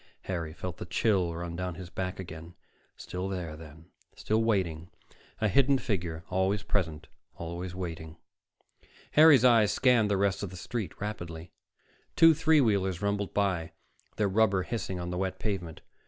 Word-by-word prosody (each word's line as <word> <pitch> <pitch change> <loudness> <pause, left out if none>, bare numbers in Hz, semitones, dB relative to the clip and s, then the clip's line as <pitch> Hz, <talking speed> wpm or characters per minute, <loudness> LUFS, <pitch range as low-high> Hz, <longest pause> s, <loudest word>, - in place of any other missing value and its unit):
Harry 85 -4 -3
felt 90 +2 -6
the - - -6
chill 95 -3 +1
run 85 0 -5
down 90 0 -3
his 90 +1 -9
back 95 0 -4
again. 85 -1 -9 0.4
Still 90 +2 -5
there, 90 -5 -4
then, 80 +1 -13 0.3
still 110 +1 0
waiting, 90 -7 0 0.5
a 110 - +2
hidden 135 +6 +4
figure, 85 -9 -3
always 95 +2 +1
present, 80 -7 -2 0.3
always 85 +2 -6
waiting.... 80 -3 -6 0.9
Harry's 150 -5 +7
eyes 115 -4 +5
scanned 125 -5 +3
the 100 - +2
rest 100 -1 +1
of 100 - -4
the 90 - -10
street 105 -1 -5
rapidly. 85 -5 -6 0.6
Two 165 0 +7
three 160 0 +4
wheelers 100 -6 +1
rumbled 100 -1 -1
by, 90 -5 -1 0.4
their 105 - +1
rubber 100 -1 +2
hissing 95 -5 -4
on 90 0 -4
the 90 - -3
wet 95 -1 -2
pavement. 90 -6 -4
95 Hz, 155 wpm, -29 LUFS, 85-105 Hz, 0.9 s, Harry's